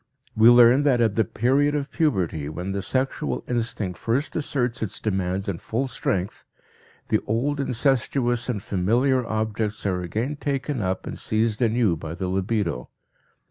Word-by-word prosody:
We 110 +1 +7
learn 120 +2 +7
that 140 -4 +3
at 115 -3 +3
the 110 - +2
period 135 +7 +1
of 145 -1 -3
puberty, 90 - 0
when 90 +5 -4
the 100 0 -2
sexual 100 - -2
instinct 110 -7 -2
first 125 +6 -1
asserts 130 -5 -1
its 110 - -4
demands 95 -2 -1
in 95 -4 -3
full 120 +5 -2
strength, 100 -6 -2 0.7
the - - +3
old 135 +7 0
incestuous 125 -2 0
and 105 -6 -2
familiar 120 +8 +1
objects 110 -1 -2
are 90 -2 0
again 110 - -3
taken 140 -2 -2
up 95 -1 -2
and - - -6
seized 110 0 0
anew 115 -5 +2
by 80 +1 -6
the 90 +1 -3
libido. 95 - -1
115 Hz, 155 wpm, -24 LUFS, 95-130 Hz, 0.7 s, We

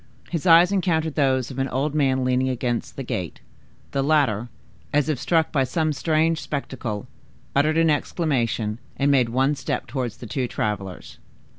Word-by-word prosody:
His 170 0 -2
eyes 170 +2 +7
encountered 165 -5 +1
those 130 -4 +1
of 130 - -9
the 135 0 0
old 140 +4 -1
man 135 -3 +2
leaning 130 +1 +2
against 120 -2 -2
the 135 - -5
gate; 90 -8 -4 0.5
the 140 - 0
latter, 135 -6 +2 0.4
as 145 0 +2
if 150 -5 0
struck 160 +1 +1
by 135 -3 +2
some 155 +4 0
strange 160 +2 +1
spectacle, 125 -7 -4 0.5
uttered 155 +3 +3
an 165 -1 +4
exclamation, 120 -9 -1 0.2
and 140 +1 +2
made 125 -4 +3
one 135 +4 +2
step 140 - -3
towards 125 -2 -4
the - - -9
two 125 +3 -2
travelers. 100 -5 -4
135 Hz, 165 wpm, -23 LUFS, 125-155 Hz, 0.5 s, eyes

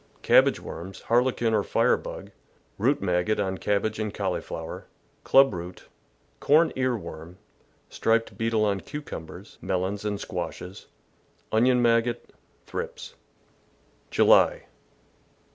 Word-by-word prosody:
— - - -32
Cabbage - - +6
worms, 90 +4 -8
Harlequin 120 -1 +1
or 105 - +3
fire - - +2
bug, - - -8 0.5
root 130 +3 +1
maggot 90 +3 +1
on 95 -2 -2
cabbage 105 +1 -1
and 110 -1 -2
cauliflower, 90 -5 -4 0.4
club 135 -3 +5
root, 90 0 -7 0.6
corn 160 +3 +4
ear 130 -2 0
worm, 85 -1 -10 0.5
striped 115 0 0
beetle 115 -1 +1
on 100 -2 0
cucumbers, 100 - -9
mel 95 -1 -1
ons, 100 +2 -3
and 105 -1 -2
squashes, 90 +3 -6 0.6
onion 125 +2 +3
maggot, 115 0 +1 0.3
thrips. 470 0 -6 1.0
July. - - +4
110 Hz, 115 wpm, -26 LUFS, 95-125 Hz, 1.0 s, Cabbage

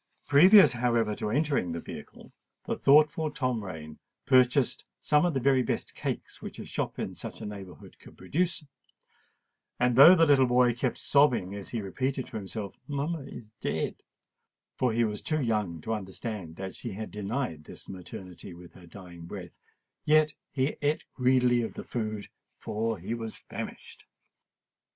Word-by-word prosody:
Previously, 175 - +7
however, 115 -3 +1
to 105 - -3
entering 140 - 0
the 85 - -3
vehicle, - - -10 0.3
the - - -1
thoughtful 150 +2 +4
Tom 125 -7 -2
Rain 80 -5 -8 0.3
purchased 130 0 +3 0.2
some 150 +3 +3
of 165 - -2
the - - +2
very 130 0 +3
best 125 - -3
cakes - - -5
which - - -8
a - - -7
shop - - -3
in - - -4
such - - -8
a - - -7
neighbourhood 100 -3 -10
could - - -16
produce; 170 -1 -1 1.1
and, 125 -1 +2
though 145 +8 +10
the 165 -2 +5
little 135 -4 +5
boy 125 0 +4
kept 125 +1 -2
sobbing 125 -10 +3
as 100 -1 -7
he 115 -3 -3
repeated 130 +7 -2
to - - -7
himself, 100 0 -6
"Mamma 145 +3 -2
is 110 -4 -11
dead,"—for 125 -2 -5
he 115 +1 +2
was 105 -2 -2
too 155 -1 -1
young 105 - -1
to 115 - -3
understand 95 -3 -5
that 95 0 -6
she 115 - -6
had 110 +2 -6
denied 105 - -3
this - - -12
maternity 90 -1 -9
with 90 0 -14
her 90 -2 -15
dying 85 -2 -11
breath,—yet 150 - -1 0.2
he 135 +2 -1
ate 145 +1 0
greedily 125 -1 +3
of 115 - -5
the - - -6
food—for 110 0 -4
he 95 +6 -5
was 115 -2 -5
famished. - - -8
120 Hz, 160 wpm, -28 LUFS, 100-140 Hz, 1.1 s, though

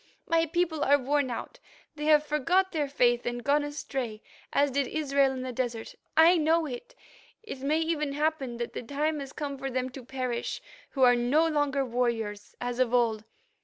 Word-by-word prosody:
My 330 0 +2
people 330 -1 0
are 285 +1 +5
worn 280 0 0
out; 235 - -6 0.4
they 300 0 -5
have 300 -1 +5
forgot 340 +6 +1
their 300 -4 -1
faith 245 -3 +2
and 240 0 -3
gone 290 +2 +2
astray, 265 -6 -4 0.3
as 285 0 +2
did 275 0 0
Israel 280 -3 +1
in 260 -1 -5
the 255 - -4
desert. 240 -2 -3 0.2
I 335 +3 +7
know 325 +1 +2
it. 275 - -8 0.5
It 430 -12 -7
may 300 +4 +1
even 305 -3 -1
happen 290 -5 -1
that 235 0 -4
the - - -4
time 295 +5 -1
has 275 -1 -7
come 280 -2 -5
for 270 +1 -3
them 255 0 -2
to 260 0 -9
perish, 255 -1 -3 0.3
who 270 - 0
are 245 -1 +7
no 265 +7 +3
longer 290 -3 +1
warriors, 230 -4 -2
as 245 0 -3
of 250 -1 +2
old. 225 -3 +1
275 Hz, 190 wpm, -28 LUFS, 245-300 Hz, 0.5 s, I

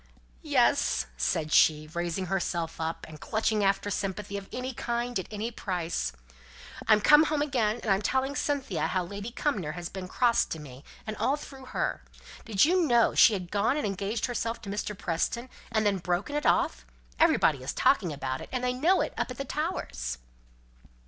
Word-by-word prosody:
"Yes!" - - +2
said 150 - -1
she, 155 -1 +5
raising 175 +2 -2
herself 175 -3 -2
up, 160 +1 -3
and 155 -2 -12
clutching 220 -1 0
after 195 +1 +1
sympathy 200 +1 -3
of 200 -1 -6
any 255 +1 -4
kind, 240 -1 -2
at 190 - -6
any 220 +2 -3
price. 175 - -2 0.8
"I'm 215 -1 +6
come 300 +6 +7
home 300 -1 +1
again, 240 -6 0
and 215 - 0
I'm 195 +1 +3
telling 265 +5 0
Cynthia 265 - -1
how 185 -1 0
Lady 200 +5 -6
Cumnor 215 - -2
has 175 -1 -6
been 190 -1 -6
so - - -16
cross 240 -2 +3
to 160 - -6
me, 135 -2 -11 0.2
and 215 -1 -4
all 275 - +2
through 270 -3 -11
her. 255 - -2 0.4
Did 215 0 +4
you 360 +3 +3
know 235 -3 +4
she 225 - +7
had 180 -3 -4
gone 210 +7 +2
and 300 - -1
engaged 200 +3 -2
herself 235 -2 -2
to 200 - -5
Mr. 210 0 -3
Preston, 235 +10 -2 0.2
and 220 -1 +1
then 200 -2 +2
broken 180 +10 -2
it 295 -3 0
off? - - +2 0.4
Everybody 140 -4 +4
is 130 - -3
talking 195 - +2
about 135 -2 -3
it, - - -9
and 255 -1 -2
they 250 0 +1
know 325 +9 +3
it - - -2
up - - -1
at 250 - -7
the 275 - -4
Towers." 60 - -3
205 Hz, 190 wpm, -28 LUFS, 175-250 Hz, 0.8 s, come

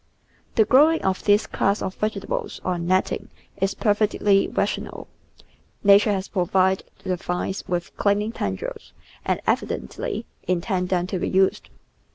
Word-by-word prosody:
The 220 - +5
growing 300 +8 +5
of 190 -1 0
this 205 +1 +4
class 200 +2 0
of 185 - -3
vegetables 210 -1 -3
on 175 -2 -1
net 185 +1 +3
ting - - -5 0.3
is 195 0 0
perfectly 205 -2 +2
rational; - - -3 0.8
Nature 205 +1 +6
has 190 -1 -2
provided 190 0 +1
the 185 -1 -1
vines 180 +2 -3
with 175 -1 -3
clinging 205 +2 +1
tendrils 95 - -5 0.3
and - - 0
evidently 65 0 -2 0.2
intended 180 +1 0
them 180 -2 +1
to 185 0 -3
be - - -1
used. 190 0 +2
190 Hz, 140 wpm, -23 LUFS, 180-205 Hz, 0.8 s, Nature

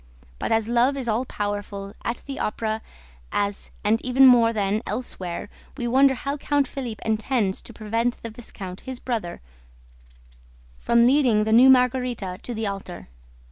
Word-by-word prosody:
But, - - -2
as 225 -1 +2
love 240 +4 +2
is 260 -3 -4
all 230 +3 0
powerful, 205 -2 -4
at 235 - -3
the 275 -1 -6
Opera 220 +1 -2 0.5
as 200 0 -2
and 215 +2 +2
even 260 +1 +5
more 240 -3 +7
than 210 -1 0
elsewhere, 185 -9 -4 0.3
we 240 -3 -2
wonder 265 +2 +4
how 275 +3 -3
Count 285 -1 +1
Philippe 245 -6 -6
intends 220 -2 0
to - - -12
prevent 230 +3 -2
the 230 - -5
viscount, 195 -5 -8
his 260 -2 -6
brother, 225 -9 -4 1.4
from 235 0 +4
leading 250 -5 +4
the 220 +1 +1
new 250 +3 +8
Margarita 250 -7 +2
to 240 - -6
the 220 0 -2
altar. 195 - -6
230 Hz, 155 wpm, -24 LUFS, 210-255 Hz, 1.4 s, new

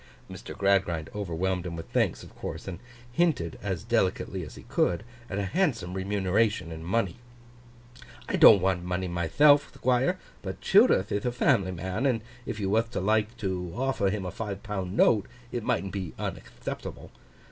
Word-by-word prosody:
Mr. - - -9
Gradgrind 95 -5 +1
overwhelmed 95 -2 -1
him 85 -1 -5
with 80 - -7
thanks, - - +1
of - - -14
course; - - -6
and 90 -3 -5 0.3
hinted 125 - +1
as 95 -3 -3
delicately 95 -5 0
as 75 - -9
he - - -11
could, 90 +3 0 0.3
at 100 - -3
a 100 - 0
handsome 115 - 0
remuneration 95 -1 0
in 80 0 -7
money. 95 0 0 1.1
'I - - 0
don't 100 - +9
want 90 -2 +1
money 90 +1 -2
mythelf, 140 - +4
Thquire; 125 0 +1 0.2
but - - -6
Childerth 95 - +4
ith 100 - 0
a 125 - 0
family 95 -6 +2
man, 95 +8 -2
and 120 -4 +1 0.3
if 110 -2 -4
you 100 - -1
wath 115 +3 +2
to - - -1
like 110 +3 +1
to 95 -5 -3
offer 130 -5 +1
him 100 -1 -3
a 90 - -3
five 100 -1 -5
pound 100 -2 -4
note, 105 -3 +4 0.2
it 120 - -2
mightn't 95 -2 -1
be 95 -4 -4
unactheptable. - - -6
95 Hz, 170 wpm, -28 LUFS, 90-110 Hz, 1.1 s, don't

